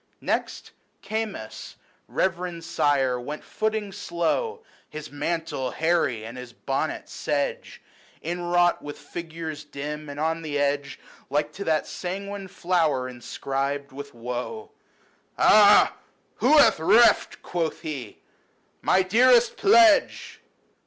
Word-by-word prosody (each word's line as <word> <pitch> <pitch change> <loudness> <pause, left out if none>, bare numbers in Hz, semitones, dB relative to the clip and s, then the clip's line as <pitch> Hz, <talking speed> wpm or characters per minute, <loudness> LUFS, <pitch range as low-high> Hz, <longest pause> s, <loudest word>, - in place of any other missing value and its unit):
LYCIDAS. - - -25
23 - - -15
Next, - - -2 0.3
Camus, 210 - -5 0.3
reverend 175 -2 -2
sire, 140 -6 +1
went 145 +5 -6
footing 215 -2 -2
slow, 440 - -2 0.3
His 155 0 -8
mantle 150 -3 -2
hairy, 155 -9 0
and 120 +3 -8
his 125 -2 -10
bonnet 135 +5 -3
sedge, 145 -1 -3 0.4
Inwrought 175 +1 +1
with 145 0 -8
figures 160 -2 -7
dim, 150 +1 -6
and 145 0 -7
on 160 +1 -1
the 150 -3 -3
edge 145 0 -1 0.3
Like 150 +1 -1
to 200 - -6
that 155 -1 +1
sanguine 195 +2 -5
flower 165 -8 0
inscribed 135 +3 -4
with 140 0 -9
woe. 125 - -5 0.3
" - - -38
Ah! 205 -1 +6 0.4
who 310 - +4
hath 230 - +6
reft," 225 +9 +4
quoth 170 -3 -3
he, 135 -8 -6 0.3
" - - -41
my 190 - +3
dearest 240 +4 +4
pledge 345 -7 +4
160 Hz, 125 wpm, -25 LUFS, 140-190 Hz, 0.4 s, Ah